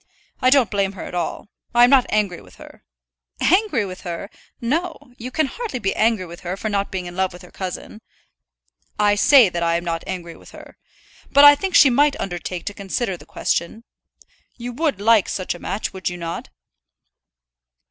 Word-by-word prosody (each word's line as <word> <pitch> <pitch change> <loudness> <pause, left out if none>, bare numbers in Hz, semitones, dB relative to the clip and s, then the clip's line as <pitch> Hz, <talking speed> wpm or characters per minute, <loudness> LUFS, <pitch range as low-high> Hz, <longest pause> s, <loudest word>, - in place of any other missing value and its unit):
I 255 - +4
don't 260 -4 +4
blame 200 -1 0
her 190 - -8
at - - -8
all. 175 +3 -4 0.3
I 240 - +7
am 245 - +6
not 265 -3 +5
angry 205 -4 0
with 90 -2 -18
her." - - -15 0.6
"Angry 370 - +2
with 185 -1 -8
her! 175 +3 -6 0.3
No. 290 +1 -3
You 245 +2 -6
can 310 +4 0
hardly 440 - -5
be 195 -5 -1
angry 220 -4 +1
with 170 0 -11
her 180 +2 -5
for 215 - -3
not 200 -1 -1
being 185 -2 -4
in 175 0 -8
love 190 0 0
with 175 - -12
her 180 - -15
cousin." 190 +3 -7 1.0
"I 210 -1 +3
say 245 +3 +6
that 175 -1 -4
I 170 0 +1
am 170 - -6
not 165 -1 -2
angry 175 -3 -6
with - - -16
her. - - -13 0.6
But 285 +1 +7
I 290 - +11
think 365 +5 -3
she 270 - +7
might 285 +3 +3
undertake 175 -1 -5
to 205 - -4
consider 200 +1 -3
the - - -15
question. 170 +7 -2 0.7
You 245 0 -6
would 295 - -1
like 220 0 +4
such 185 - -3
a 175 - -11
match, 195 +4 -4
would 190 -1 -3
you 180 - -7
not?" 170 -1 -6
205 Hz, 200 wpm, -21 LUFS, 180-255 Hz, 1.0 s, I